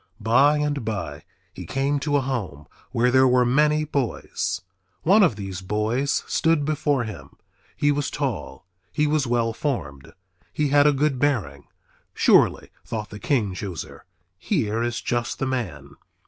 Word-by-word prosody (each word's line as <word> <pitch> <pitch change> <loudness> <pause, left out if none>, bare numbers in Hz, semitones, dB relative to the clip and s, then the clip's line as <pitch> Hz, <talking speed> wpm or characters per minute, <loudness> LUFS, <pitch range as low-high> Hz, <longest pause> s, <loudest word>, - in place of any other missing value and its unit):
By 130 +7 +4
and 145 -3 -1
by 85 -10 -5 0.3
he - - -9
came 140 +2 0
to 145 0 +1
a - - +1
home 110 - -4 0.3
where 125 0 +2
there 130 +1 +5
were 125 0 +4
many 150 +4 +3
boys. 105 - -2 0.4
One 200 +6 +5
of 175 - +4
these 95 -2 -6
boys 110 +8 0
stood 165 -3 +1
before 145 -3 0
him. 85 - -8 0.5
He 145 - +3
was 145 0 -1
tall. 120 - -4 0.3
He 150 - +1
was 150 -3 +1
well 115 -1 +1
formed. 75 - -4 0.4
He 150 -1 0
had 145 +1 +5
a - - +6
good 140 -1 0
bearing. 105 - -1 0.5
Surely, - - +3
thought 110 -2 -5
the 105 - -8
king 105 -5 0
chooser, 90 -2 -7 0.3
here 115 - -1
is 120 -1 -2
just 120 -1 -2
the - - -2
man. 90 - -4
125 Hz, 155 wpm, -24 LUFS, 105-145 Hz, 0.5 s, a